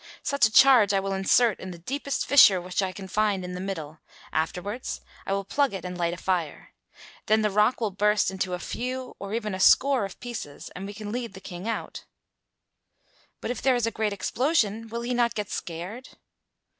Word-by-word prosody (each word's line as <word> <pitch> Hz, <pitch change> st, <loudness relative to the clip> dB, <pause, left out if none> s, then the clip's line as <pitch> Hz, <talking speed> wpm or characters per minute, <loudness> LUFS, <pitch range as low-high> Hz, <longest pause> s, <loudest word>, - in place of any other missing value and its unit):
Such 280 Hz, -5 st, +3 dB
a -, -, -9 dB
charge 230 Hz, -4 st, +6 dB
I -, -, +3 dB
will 195 Hz, 0 st, -2 dB
insert 195 Hz, +3 st, +3 dB
in 185 Hz, -, -7 dB
the 175 Hz, -, -8 dB
deepest 275 Hz, -, -3 dB
fissure 210 Hz, -9 st, +7 dB
which 180 Hz, +2 st, -2 dB
I 190 Hz, -1 st, -1 dB
can 190 Hz, 0 st, -9 dB
find 200 Hz, -1 st, 0 dB
in 180 Hz, -, -6 dB
the 180 Hz, -, -5 dB
middle; 160 Hz, -5 st, -5 dB, 0.3 s
afterwards 180 Hz, +9 st, -3 dB, 0.3 s
I 195 Hz, -, 0 dB
will 200 Hz, 0 st, -1 dB
plug 275 Hz, +3 st, 0 dB
it 185 Hz, -, -6 dB
and 180 Hz, 0 st, -5 dB
light 170 Hz, -1 st, -1 dB
a -, -, -13 dB
fire. 175 Hz, -5 st, -3 dB, 0.5 s
Then 215 Hz, 0 st, +3 dB
the 210 Hz, -, +1 dB
rock 210 Hz, +5 st, +3 dB
will 220 Hz, -3 st, -1 dB
burst 210 Hz, 0 st, +2 dB
into 190 Hz, -1 st, -2 dB
a -, -, -7 dB
few 255 Hz, +5 st, -5 dB
or 200 Hz, +2 st, -4 dB
even 215 Hz, -3 st, -3 dB
a 185 Hz, -, -4 dB
score 265 Hz, +5 st, +5 dB
of 195 Hz, -, -7 dB
pieces 230 Hz, -12 st, -7 dB
and 190 Hz, +2 st, -6 dB
we 205 Hz, -, -8 dB
can 210 Hz, -1 st, -6 dB
lead 235 Hz, -4 st, -4 dB
the -, -, -8 dB
King 185 Hz, +1 st, -8 dB
out." 230 Hz, -, -5 dB, 1.4 s
"But -, -, -2 dB
if 245 Hz, -, -5 dB
there 265 Hz, -2 st, +3 dB
is 240 Hz, -2 st, +1 dB
a 230 Hz, -, -1 dB
great 215 Hz, -1 st, -1 dB
explosion, 225 Hz, -, 0 dB
will 235 Hz, +1 st, -5 dB
he 240 Hz, +1 st, -2 dB
not 235 Hz, -1 st, +1 dB
get 210 Hz, -1 st, -4 dB
scared?" 180 Hz, +9 st, -6 dB
205 Hz, 210 wpm, -26 LUFS, 185-235 Hz, 1.4 s, fissure